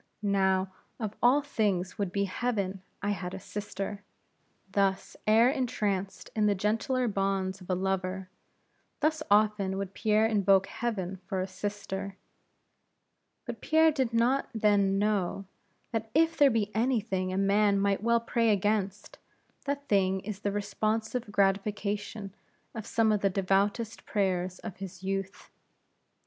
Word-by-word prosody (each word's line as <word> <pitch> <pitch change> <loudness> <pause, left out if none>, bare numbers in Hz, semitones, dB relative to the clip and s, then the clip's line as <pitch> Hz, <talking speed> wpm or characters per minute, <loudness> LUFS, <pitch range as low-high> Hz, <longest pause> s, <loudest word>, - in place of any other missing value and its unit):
Now, 190 -1 +2 0.3
of 215 -3 -3
all 265 +4 +5
things, 205 -8 -1
would 200 -3 -1
to 200 0 +2
heaven, 195 -2 -2 0.2
I 205 - +1
had 185 -2 -4
a - - -6
sister!" 205 0 -5 0.7
Thus, 195 -1 0
ere 225 +4 +6
entranced 205 -8 -2
in 215 -1 +3
the 205 - +3
gentler 225 +6 0
bonds 195 -2 -1
of 180 - -13
a 185 - +2
lover; 190 0 -2 0.7
thus 310 +1 +1
often 205 -2 +3
would 195 -1 -4
Pierre 215 -1 +2
invoke 200 -3 +4
heaven 195 -6 -3
for 190 - -2
a 185 - 0
sister; 195 0 -5 1.3
but - - -6
Pierre 320 0 +4
did 265 -5 0
not 240 +4 +2
then 205 -2 +3
know, 200 -2 0 0.5
that 225 -1 -2
if 325 +1 +4
there 290 -3 +6
be 220 -4 0
any 240 +2 +2
thing 190 -3 -2
a 185 - -2
man 200 +1 +3
might 195 0 +1
well 235 +1 +3
pray 230 0 +1
against, 205 -1 0 0.5
that 285 0 -3
thing 190 -2 +2
is 200 0 -6
the 205 0 -1
responsive 215 +3 -2
gratification 200 0 -1 0.4
of 220 -3 -6
some 225 -1 +2
of 210 -2 +1
the 195 - +3
devoutest 200 +4 0
prayers 185 -3 0
of 215 -5 -8
his 190 -1 -8
youth. 195 0 -4
200 Hz, 145 wpm, -29 LUFS, 195-220 Hz, 1.3 s, ere